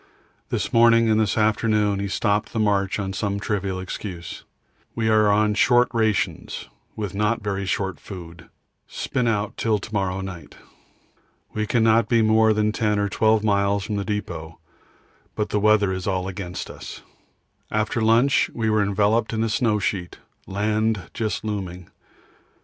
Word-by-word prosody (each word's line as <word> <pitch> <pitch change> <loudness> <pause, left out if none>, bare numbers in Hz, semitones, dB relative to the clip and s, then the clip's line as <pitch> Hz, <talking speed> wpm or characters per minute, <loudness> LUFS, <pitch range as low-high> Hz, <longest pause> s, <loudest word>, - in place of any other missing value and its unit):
This - - -2
morning 115 -1 +5
and 110 - +3
this 110 -1 +1
afternoon 105 -1 +2
he 100 - -2
stopped 105 +2 0
the 115 - -1
march 100 -2 +1
on 95 -2 -3
some 100 0 -2
trivial 100 -2 -2
excuse. 90 -2 -7 0.5
We 110 -1 0
are 110 -1 +4
on 105 +1 +3
short 120 +3 +4
rations 110 -3 -1 0.3
with 105 -4 -4
not 105 +3 0
very 100 -1 -2
short 95 -1 -2
food; 85 -3 -10 0.4
spin 125 -2 -2
out 105 -2 -1
till 110 -2 +1
to 110 +2 -9
morrow 95 -2 -1
night. 90 -3 -8 1.0
We 105 0 -2
cannot 115 -1 +3
be 115 -2 +4
more 110 0 +4
than 105 0 +1
10 105 -1 0
or 100 0 0
12 110 +1 +2
miles 100 -1 +1
from 105 +1 -3
the 100 - -1
depot, 85 -6 -5 0.8
but 105 - -2
the 105 - 0
weather 105 -2 +3
is 95 0 -4
all 95 -1 -1
against 95 -2 -6
us. - - -10 0.7
After 110 +3 -1
lunch 115 +5 +3
we 110 -2 0
were 110 -1 +3
enveloped 105 +3 +1
in 110 0 0
a 115 - 0
snow 110 -1 +1
sheet, 95 -3 -3 0.3
land 105 -3 -1
just 110 -2 -2
looming. 90 -4 -5
105 Hz, 160 wpm, -23 LUFS, 100-110 Hz, 1.0 s, morning